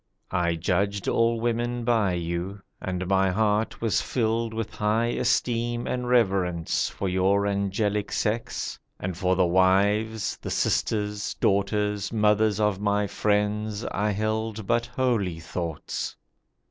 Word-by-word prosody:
I 85 -2 +1
judged 100 +4 0
all 115 0 +2
women 120 +1 -1
by 110 -5 +2
you, 85 +3 -3 0.2
and 95 0 -3
my 95 +1 +3
heart 105 +3 0
Was 115 -5 +1
filled 115 -1 0
with 110 -1 -4
high 110 +3 +1
esteem 120 -1 0
and 125 -1 -2
reverence 95 -8 +1
For 100 - -4
your 95 +2 +2
angelic 100 +1 0
sex; 110 +2 -2 0.2
and 90 -1 -3
for 90 +1 +1
the 90 -1 +3
wives, 100 +4 +2
The - - -5
sisters, 105 -1 0
daughters, 105 0 0
mothers 105 -1 +3
of 105 -3 +1
my 105 0 +1
friends 105 +1 0
I 105 +2 0
held 110 +1 -2
but 120 +2 +1
holy 120 -9 0
thoughts. 80 -1 -4
105 Hz, 130 wpm, -26 LUFS, 95-110 Hz, 0.2 s, my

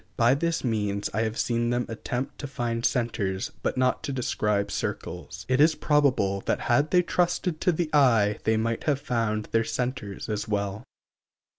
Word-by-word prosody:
By 120 +2 +5
this 170 +4 -1
means 105 -4 -1
I 110 - 0
have 110 0 -2
seen 120 0 0
them 120 0 0
attempt 125 +3 -4
to 145 - -4
find 120 -3 -3
centers, 105 -7 -1
but - - -1
not 130 0 +2
to 145 - -3
describe 105 -5 0
circles. 90 +3 -5
It 130 +2 +3
is 155 +1 +5
probable 130 -12 +2
that - - +1
had 145 +5 +2
they 180 +1 +4
trusted 175 -1 0
to 180 - +3
the 160 -1 -2
eye 115 -8 +4
they 110 0 +2
might 115 +1 -1
have 145 -3 +2
found 115 -5 -1
their 115 0 +3
centers 125 -5 -3
as 105 -1 -3
well. 100 0 -2
120 Hz, 175 wpm, -26 LUFS, 105-140 Hz, -, By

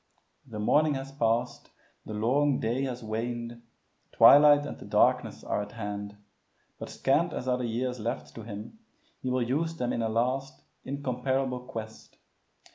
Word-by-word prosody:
The 115 -4 -8
morning 150 +8 +3
has 135 0 -6
passed, 120 -2 -1 0.4
the 110 - -5
long 135 +6 +2
day 120 +5 -1
has 125 -2 -5
waned, 115 +2 -4 0.5
twilight 145 0 +7
and - - -7
the - - -10
darkness - - +2
are - - -1
at 105 0 -8
hand. 105 -2 -6 0.6
But - - -6
scant 160 +5 +1
as 125 - -5
are 125 0 +1
the 125 - -2
years 125 +2 -2
left 115 +3 -4
to 115 - -8
him, 110 - -9 0.4
he 130 - -2
will 125 -1 +1
use 160 +6 -1
them 125 -6 -2
in 115 - -1
a 110 - 0
last, 130 +5 -1 0.2
incomparable 130 -1 -2
quest. 115 -3 -9
125 Hz, 160 wpm, -28 LUFS, 115-135 Hz, 0.6 s, twilight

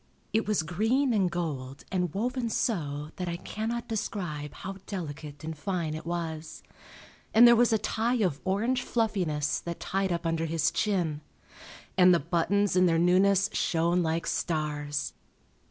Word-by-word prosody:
It 220 -1 +1
was 210 -6 +1
green 225 - +1
and 195 -4 +2
gold 145 -6 -4
and 180 -3 0
woven 240 - -1
so 150 - -1
that 180 -1 -3
I 170 - -3
cannot 225 +5 -4
describe 175 - -3
how 190 +1 -7
delicate 150 -5 -6
and 160 0 -4
fine 170 -1 -2
it 155 +1 -6
was, 165 -2 -4 0.7
and 235 +2 +9
there 235 - +8
was 240 0 +4
a 220 - +4
tie 225 +3 0
of 160 -7 -1
orange 225 +7 +1
fluffiness 185 - 0
that 170 -1 -6
tied 195 0 -1
up 170 0 -2
under 165 0 0
his 160 0 +1
chin. 175 -8 0 0.8
And 180 -1 +7
the - - +2
buttons 180 +6 +1
in 185 0 +5
their 165 -1 +3
newness 190 +3 +4
shone 170 +2 +1
like 165 0 -1
stars. 150 -2 -2
175 Hz, 155 wpm, -28 LUFS, 160-205 Hz, 0.8 s, and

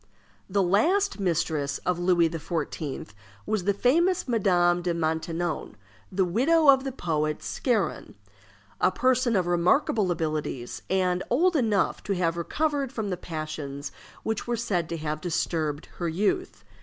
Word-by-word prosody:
The 195 +1 +2
last 335 - +2
mistress 160 -6 0
of 180 -1 0
Louis 175 -1 +3
XIV. 160 -5 -4 0.4
was 210 -4 -1
the 200 - +3
famous 340 - +2
Madame 180 -6 +3
de 175 -1 -1
Maintenon, 165 -2 -2 0.4
the 190 0 +2
widow 285 - +3
of 265 -1 +6
the 270 - -3
poet 155 - -2
Scarron; 200 - -1 0.6
a - - +4
person 250 +2 +2
of 185 -2 +2
remarkable 180 - +2
abilities, 155 -7 -3
and 185 -1 +1
old 340 +8 +3
enough 220 -8 +1
to 200 - 0
have 170 -2 0
recovered 280 - -1
from 220 -6 -3
the - - 0
passions 155 -4 -6 0.3
which 220 0 -2
were 240 -1 0
said 180 -8 -1
to 170 - -3
have 155 -1 -3
disturbed 155 -3 -1
her 170 -2 -1
youth. 210 - -1
180 Hz, 145 wpm, -26 LUFS, 165-235 Hz, 0.6 s, of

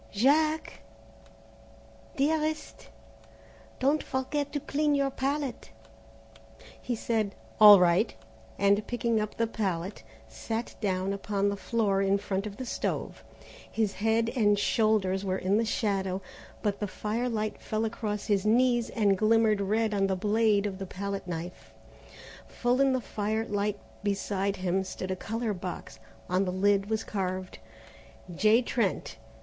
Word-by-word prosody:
"Jack?" 305 +8 +2 1.3
"Dearest?" 310 +2 -1 0.9
"Don't 285 +4 +2
forget 280 +2 -2
to 290 - -2
clean 295 +1 0
your 275 -1 +1
palette." 275 - -3 1.1
He 245 - -2
said, 220 -3 -1 0.2
"All 210 -2 +11
right," 180 +5 +3 0.4
and 200 +1 +2
picking 235 -2 0
up 210 - -5
the 230 - +2
palette, 195 - -3 0.3
sat 225 - -4
down 190 -1 0
upon 200 0 -1
the 200 - -2
floor 200 -1 0
in 195 0 +3
front 200 0 -3
of 200 - -9
the 260 - -5
stove. - - -3 0.5
His 215 -3 0
head 225 +2 +1
and 205 -4 +3
shoulders 200 -3 +1
were 190 -1 -1
in 190 +3 +1
the 230 - +1
shadow, 195 -4 -1 0.4
but 205 -2 0
the 205 - -2
firelight 215 +2 -2
fell 220 +1 -1
across 215 -2 -3
his 205 -3 +1
knees 240 +2 +3
and 205 -3 +2
glimmered 215 0 +3
red 215 +2 +1
on 195 -1 +2
the 190 - 0
blade 210 +1 +2
of 195 -2 -4
the 195 - -5
palette 195 +1 -5
knife. 175 +1 -7 0.7
Full 245 +2 0
in 270 -1 +4
the 255 - 0
firelight 210 -1 -2 0.2
beside 200 -1 -1
him 190 0 0
stood 185 0 -5
a - - 0
colour 225 +3 -3
box. 180 - -7 0.3
On 185 +2 +1
the 185 - -1
lid 200 +2 +2
was 220 0 0
carved, 185 - -4 0.7
J. 215 +7 +4
TRENT. 240 0 -1
210 Hz, 140 wpm, -28 LUFS, 195-230 Hz, 1.3 s, All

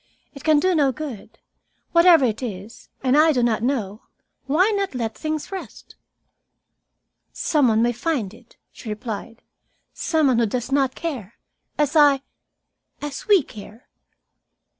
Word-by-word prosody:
"It 280 - -12
can 310 -2 +4
do 370 +4 +2
no 290 -5 +3
good. 260 -6 -8 0.5
Whatever 335 -4 +6
it 225 -1 -2
is, 210 -2 -8
and 260 0 +3
I 315 +2 +5
do 250 -5 +1
not 225 -3 +1
know, 225 -5 -2 0.5
why 360 +10 +3
not 395 -7 -2
let 230 -3 -2
things 310 +1 -4
rest?" 385 -1 -9 1.4
"Some 295 -5 +1
one 225 0 +3
may 240 - +2
find 240 - -2
it," 235 +1 -19
she 230 - -10
replied. 220 +2 -6 0.5
"Some 320 -2 0
one 255 -4 +3
who 230 - +2
does 245 +4 -4
not 270 -2 +1
care, 250 - -5 0.4
as 295 +1 0
I 285 -3 +5 0.8
as 290 -1 -7
we 400 -7 +5
care." 215 +1 -13
265 Hz, 145 wpm, -22 LUFS, 230-310 Hz, 1.4 s, Whatever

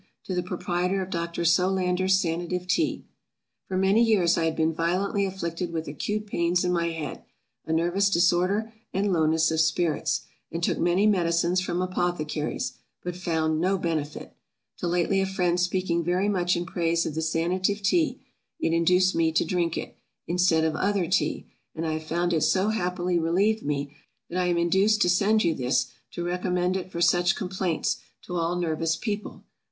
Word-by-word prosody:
To 185 - -4
the 180 - 0
Proprietor 180 +1 -1
of 185 - -9
Dr. 170 0 -2
SOLANDER'S 185 +1 +2
SANATIVE 175 +1 -2
TEA. 250 - 0 0.6
FOR 185 - -2
many 195 +4 +4
years 190 -7 +3
I 165 - 0
had 160 -1 0
been 160 0 +1
violently 185 +5 0
afflicted 175 -2 -4
with 160 -1 -4
acute 210 +9 -3
pains 175 -2 0
in 180 - +1
my 170 -1 +1
head, 160 -4 -5 0.5
a - - -2
nervous 175 +5 +2
disorder, 185 +5 +2 0.2
and 195 0 0
lowness 160 -1 +2
of 160 - 0
spirits, 160 0 +1 0.3
and 170 +1 -4
took - - +1
many 175 +4 +2
medicines 175 -2 +2
from 180 0 -1
apothecaries, 155 -8 -2 0.2
but 180 -1 -4
found 160 -3 0
no 190 +2 +2
benefit; 160 -4 -3 0.4
till 175 - -3
lately 180 +3 +1
a 195 - 0
friend 180 -2 0
speaking 180 -1 0
very 180 +4 +1
much 180 -3 +1
in 175 - -3
praise 170 -1 0
of - - -3
the 160 - -2
Sanative 185 +5 0
Tea; 315 - +2 0.4
it 165 - 0
induced 180 +3 +3
me 165 -1 +2
to - - +2
drink 170 -1 0
it, - - -6 0.3
instead 175 -2 +2
of 160 -1 0
other 200 +1 +1
tea; 185 - 0 0.3
and 165 0 -3
I 160 - -1
have 155 0 -4
found 175 +2 0
it 160 - +1
so 190 +6 +2
happily 180 -4 0
relieved 195 +7 +1
me, 145 0 -3 0.4
that 180 - -1
I 180 - +1
am 175 -1 +1
induced 190 +5 +3
to 180 - +2
send 215 +4 +3
you 170 -2 +2
this, 125 -2 0 0.2
to 175 - -4
recommend 180 +1 0
it 185 -1 -4
for 170 - -4
such 175 +1 +3
complaints, 185 -3 -1 0.3
to 180 - -6
all 170 0 0
nervous 165 -2 0
people. 205 +3 -5
175 Hz, 180 wpm, -26 LUFS, 165-185 Hz, 0.6 s, many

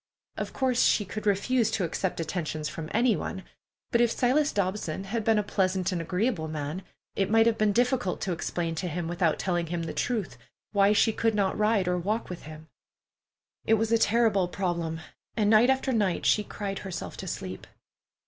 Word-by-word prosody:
Of - - -4
course 255 -2 +1
she 205 - +3
could 215 +2 -5
refuse 220 +4 +2
to 215 - -1
accept 175 +2 -2
attentions 160 -2 -3
from 160 0 -6
any 230 0 +3
one, 190 - -5 0.5
but 235 - +3
if 240 - +4
Silas 275 +6 +2
Dobson 190 -3 -2
had 220 +3 -3
been 225 0 +3
a 210 - +2
pleasant 190 -2 0
and 175 -2 -2
agreeable 180 0 -1
man, 155 +3 -4 0.3
it 195 -1 0
might 225 +1 +5
have 230 -1 +2
been 215 -1 +3
difficult 245 -3 +1
to 190 - -1
explain 170 0 -2
to 180 - -3
him 170 0 -3
without 170 -1 +1
telling 175 -2 -1
him 170 0 -3
the 165 - -4
truth 205 - -2 0.3
why 200 -1 +4
she 220 +1 +3
could 225 0 +1
not 200 -2 +1
ride 210 -2 +2
nor 180 0 0
walk 210 +4 -2
with 175 - -8
him. 155 0 -10 1.0
It 225 - +4
was 225 +1 -1
all 230 - +5
a - - -6
terrible 220 -4 +3
problem, 170 -3 -2 0.4
and 210 -1 +3
night 225 +3 +6
after 265 0 +1
night 205 -6 0
she 210 - +4
cried 200 -1 -5
herself 190 -3 -6
to - - -6
sleep. - - -6
195 Hz, 195 wpm, -27 LUFS, 175-225 Hz, 1.0 s, night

